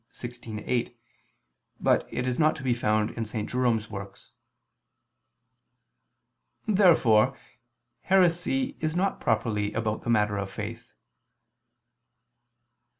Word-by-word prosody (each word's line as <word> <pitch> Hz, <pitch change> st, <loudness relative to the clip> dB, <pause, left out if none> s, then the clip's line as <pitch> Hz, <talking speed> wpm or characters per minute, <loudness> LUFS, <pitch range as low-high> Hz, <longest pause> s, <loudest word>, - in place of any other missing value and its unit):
16, 120 Hz, -3 st, -8 dB
A. -, -, -7 dB
8, 120 Hz, -1 st, -1 dB, 0.8 s
but -, -, +2 dB
it 125 Hz, -, -2 dB
is 125 Hz, +2 st, -1 dB
not 155 Hz, -1 st, +4 dB
to 140 Hz, -, -9 dB
be 125 Hz, -2 st, +2 dB
found 110 Hz, -2 st, +1 dB
in 115 Hz, -, -4 dB
St. 110 Hz, -1 st, -4 dB
Jerome's 120 Hz, -4 st, 0 dB
works.] 100 Hz, -1 st, -9 dB, 2.3 s
Therefore 135 Hz, -, +4 dB, 0.6 s
heresy 190 Hz, +9 st, +2 dB
is 155 Hz, 0 st, -2 dB
not 195 Hz, +2 st, 0 dB
properly 110 Hz, -2 st, 0 dB
about 110 Hz, -1 st, -2 dB
the -, -, -5 dB
matter 105 Hz, -3 st, +2 dB
of 100 Hz, -1 st, -4 dB
faith. 110 Hz, +3 st, -7 dB
120 Hz, 110 wpm, -27 LUFS, 105-155 Hz, 2.3 s, not